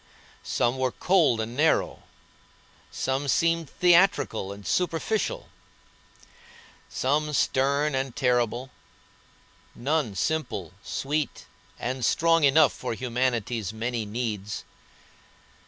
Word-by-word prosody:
Some 120 +2 0
were 130 -1 +1
cold 160 -11 +2
and 110 +2 -4
narrow, 155 +3 +1 0.9
some 135 +2 -2
seemed 165 +1 +1
theatrical 175 - +3
and 100 0 -10
superficial, 210 - -1 1.4
some 150 +3 0
stern 140 +2 +1
and 130 -2 -2
terrible, 125 0 0 1.0
none 135 -4 -1
simple, 100 - -2
sweet, 145 +1 -3 0.3
and 125 +1 -3
strong 165 +5 +3
enough 145 +1 +5
for 125 -2 -4
humanity's 120 -4 -1
many 115 +1 -3
needs. 105 -2 -4
130 Hz, 90 wpm, -26 LUFS, 120-155 Hz, 1.4 s, enough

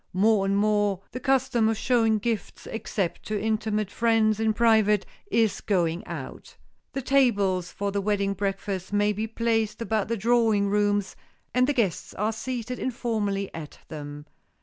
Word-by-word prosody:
More 200 +1 +3
and 195 0 +1
more 205 -2 +2
the 255 - -5
custom 260 -4 +2
of 225 - 0
showing 225 -2 +2
gifts, 225 0 -3
except 200 -5 -3
to 215 -1 -1
intimate 215 -1 -1
friends 225 -2 +2
in 220 0 +2
private, 215 -2 +3 0.2
is 225 - +1
going 175 -1 0
out. - - -8 0.4
The 270 - -3
tables 205 -10 +2
for 200 0 -3
the 200 0 -1
wedding 200 -1 0
breakfast 195 -1 -3
may 205 0 +2
be 215 +2 -3
placed 225 -1 0
about 220 -3 -1
the 230 +1 -1
drawing 220 -2 +2
rooms, 205 -1 +1 0.4
and 250 +1 +3
the 290 - +2
guests 200 - -1
are 215 +3 0
seated 245 +2 -4
informally 215 -6 -2
at 155 -3 -8
them. 145 -1 -7
215 Hz, 155 wpm, -26 LUFS, 200-230 Hz, 0.4 s, More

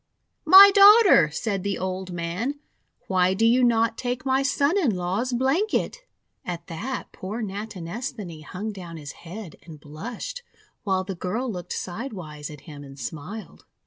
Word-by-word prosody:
"My 390 +4 +11
Daughter," 400 - +7
said 195 +5 -3
the 200 +1 -2
old 185 0 -4
man, 180 +12 -3 0.5
"why 185 0 +2
do 225 - +2
you 245 +3 +4
not 230 -1 +2
take 250 +1 -3
my 265 0 +2
son 280 +4 +1
in 295 - +2
law's 185 +8 -2
blanket?' 275 - 0 0.4
At 170 -1 -6
that 210 +11 -5
poor 215 +5 -6
Natinesthani 200 -2 -6
hung 195 +8 -6
down 175 -5 -9
his 145 -3 -8
head 175 0 -10
and 160 -3 -12
blushed, 230 - -7 0.4
while 190 -2 0
the 190 +1 -5
girl 215 +8 -3
looked 180 -3 -6
side 225 +8 -5
wise 150 -6 -8
at 150 -2 -11
him 145 -1 -11
and 135 -1 -12
smiled. 160 - -8
200 Hz, 155 wpm, -24 LUFS, 170-245 Hz, 0.5 s, My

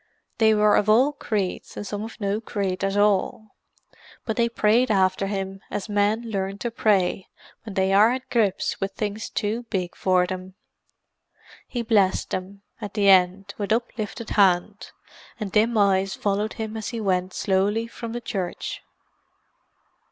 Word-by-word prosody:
They 220 -1 +5
were 210 0 +4
of 210 - +1
all 250 +7 +5
creeds 210 -9 -3
and 205 - -5
some 205 0 -4
of 225 - -9
no 205 +1 -1
creed 195 -4 -3
at 195 +1 0
all: 205 +1 +1 0.7
but 220 - -2
they 235 -1 +2
prayed 230 +2 +2
after 190 -1 +2
him 195 -1 -4
as 205 - -4
men 205 +2 +1
learn 195 -3 -3
to 235 +3 -3
pray 195 -5 +1 0.3
when 210 -3 -9
they 190 0 +2
are 210 +4 +6
at 255 +1 -4
grips 215 -6 0
with 195 0 -2
things 210 +1 -4
too 220 +2 -2
big 185 -5 -2
for 185 -1 +2
them. 185 +1 -7 1.1
He 240 -2 -3
blessed 205 -5 +2
them, 195 +2 -5 0.2
at 205 -2 -6
the 200 -2 +3
end, 190 +1 +4
with 205 0 -3
uplifted 230 -1 -2
hand; 200 +1 +2 0.5
and 210 -3 -4
dim 220 +3 +2
eyes 195 -1 +2
followed 205 +1 -1
him 220 -1 -5
as 220 -1 -4
he 230 -1 -4
went 185 -3 -1
slowly 200 +4 +1
from 230 0 -7
the 240 +1 -4
church. 190 -6 -4
205 Hz, 160 wpm, -24 LUFS, 195-220 Hz, 1.1 s, are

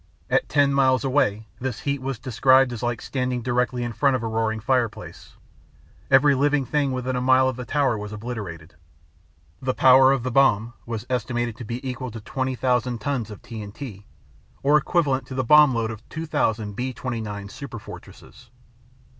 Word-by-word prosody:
At - - +2
ten 145 -1 +3
miles 130 -3 +3
away, 110 -6 +1
this 130 -3 -4
heat 140 -1 -2
was 135 -1 -3
described 130 +1 +3
as 120 - -6
like 120 -2 -2
standing 125 -2 -2
directly 125 0 0
in 120 -1 -4
front 140 +2 +2
of 125 - -3
a - - -1
roaring 110 0 -1
fireplace. 120 -1 -2 0.7
Every 140 +2 +6
living 145 0 +1
thing 145 0 0
within 130 0 -2
a 125 - -1
mile 130 +1 +4
of 130 - -1
the 125 0 -7
tower 140 -5 +1
was 105 0 -6
obliterated. 105 -8 -7 0.9
The 130 0 -1
power 130 0 +6
of 135 -3 0
the 130 - -2
bomb 120 -3 +3
was 115 -1 -4
estimated 120 -2 -2
to 120 - -8
be 120 +5 -5
equal 130 0 -4
to 115 0 -8
20,000 125 0 -1
tons 125 -1 -2
of 105 - -11
TNT, 105 -1 -8 0.6
or 145 +2 +4
equivalent 150 -3 +1
to 130 - -7
the 130 - 0
bomb 150 0 +6
load 115 -1 -1
of 110 0 -11
2,000 115 -10 -2
B 130 +3 -3
29, 110 -6 -5
Superfortresses! 115 -3 -11
125 Hz, 170 wpm, -24 LUFS, 115-135 Hz, 0.9 s, Every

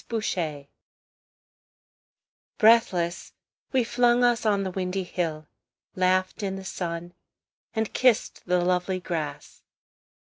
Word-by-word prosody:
The 230 - -1
Hill 160 -9 -2 1.9
Breathless, 205 -6 +3 0.4
we 260 -2 +3
flung 240 +1 +3
us 240 -2 +2
on 200 -2 +2
the 190 - -3
windy 185 +1 -2
hill, 160 -4 -3 0.5
Laughed 185 +2 +1
in 195 -1 -2
the 195 0 -8
sun, 175 -1 -5 0.6
and 220 -1 -1
kissed 250 -7 +1
the 180 0 +2
lovely 180 +1 0
grass. 165 -5 -5
185 Hz, 110 wpm, -26 LUFS, 175-220 Hz, 1.9 s, Breathless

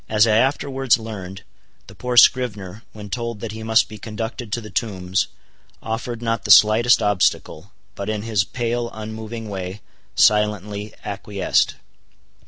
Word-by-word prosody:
As 105 0 +4
I 110 -2 +3
afterwards 135 0 +2
learned, 100 -4 -8 0.4
the - - -14
poor 125 -1 -4
scrivener, 105 -6 +3
when 105 -2 -10
told 115 -1 -4
that 115 - -5
he 110 +1 -8
must 110 0 +3
be 110 - -11
conducted 110 +1 -6
to 120 - -1
the 110 -2 -10
Tombs, 95 -6 -1 0.5
offered 115 +1 -5
not 115 -3 -1
the - - -6
slightest 115 +3 +6
obstacle, 100 -2 0 0.2
but 100 +1 -5
in 105 -1 -2
his 110 -4 +1
pale 120 +3 -2
unmoving 110 +1 -7
way, 95 0 -6 0.3
silently 105 0 +2
acquiesced. 100 -1 0
110 Hz, 145 wpm, -21 LUFS, 105-115 Hz, 0.5 s, slightest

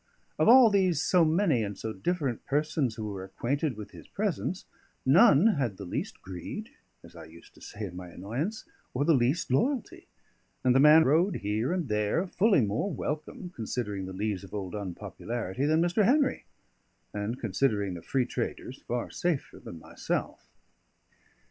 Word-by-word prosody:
Of 155 - +3
all 245 -2 +8
those 185 -6 +2
so 180 +1 +3
many 160 - +2
and 100 -2 -4
so 110 +2 -4
different 140 - -2
persons 145 -4 0
who 110 - -5
were 95 -2 -6
acquainted 130 +7 -2
with 105 - -8
his - - -13
presence, 190 -4 -2 0.4
none 160 - +6
had 120 -8 -1
the 100 - -7
least 90 - -5
greed 90 -2 -7 0.3
as - - -15
I - - -10
used 85 +1 -16
to - - -20
say 105 0 -7
in 90 -3 -8
my 90 0 -7
annoyance 120 - -4 0.3
or 140 +3 +1
the 165 - +5
least 130 +4 +1
loyalty; 285 - -1 0.6
and 125 -1 +4
the 135 - +4
man 150 +3 +8
rode 170 +7 +3
here 105 +6 -1
and 180 -5 -1
there 105 - 0
fully 195 - +3
more 110 - -1
welcome, 155 +4 -5
considering 105 -4 -4
the - - -6
lees 100 0 -2
of 95 - -9
old 95 -3 -5
unpopularity, 105 +5 -4
than 160 +2 +3
Mr. 175 +5 +2
Henry 275 +6 +2 0.7
and, 105 +4 -3
considering 105 -3 0
the 85 - -7
free 130 +5 0
traders, 125 +1 -5
far 120 0 -3
safer 170 -6 -2
than 85 - -9
myself. 80 - -4
130 Hz, 165 wpm, -28 LUFS, 105-170 Hz, 0.7 s, all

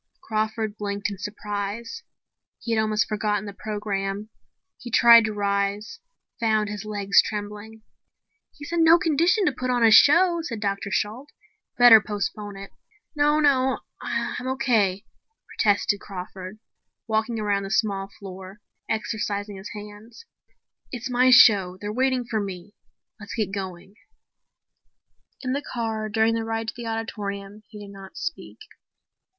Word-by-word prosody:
Crawford 215 0 -2
blinked 205 0 -3
in 195 - -8
surprise. 210 - -5 0.6
He 230 - -5
had 220 -1 +2
almost 215 -1 0
forgotten 210 -1 -1
the 200 - -7
program. 205 -1 -4 0.5
He 245 - -8
tried 235 0 +7
to 215 - -2
rise, 200 - -2 0.4
found 215 -2 +1
his 210 0 -6
legs 200 -2 +3
trembling. 210 +1 -7 0.7
"He's 290 +2 -9
in 340 -1 +2
no 325 +1 +7
condition 340 +5 +2
to 300 - +3
put 255 -1 -4
on 245 -1 +2
a 225 - +6
show," 340 +8 +6
said 240 -9 -5
Dr. 200 -1 -2
Shalt. 220 +7 -2 0.5
"Better 240 -3 +9
postpone 205 0 -4
it." 195 0 -10 0.4
"No, 295 +1 +3
no, 265 -3 +2 0.2
I'm 250 - -3
okay," 220 -7 +1 0.4
protested 205 -1 +1
Crawford, 185 +1 -8 0.5
walking 220 +1 -1
around 205 -2 0
the 195 - -6
small 195 -2 0
floor, 190 0 -10 0.3
exercising 210 -2 -3
his 190 +2 -9
hands. 210 - -11 0.7
"It's 250 0 -5
my 250 +1 +4
show. 200 -7 +6
They're 205 +1 -5
waiting 260 0 +1
for 225 -2 -2
me. 195 -1 -6 0.5
Let's 200 -1 -8
get 215 -4 -1
going." 190 -1 -6 1.5
In 255 0 -1
the 280 - -1
car, 225 -5 -4
during 220 +1 +2
the 225 0 -1
ride 225 0 -3
to - - -6
the 235 -1 -7
auditorium, 205 -2 -5
he 210 -2 -10
did 200 - -12
not 195 -1 -12
speak. 335 - -6
215 Hz, 145 wpm, -24 LUFS, 200-235 Hz, 1.5 s, Better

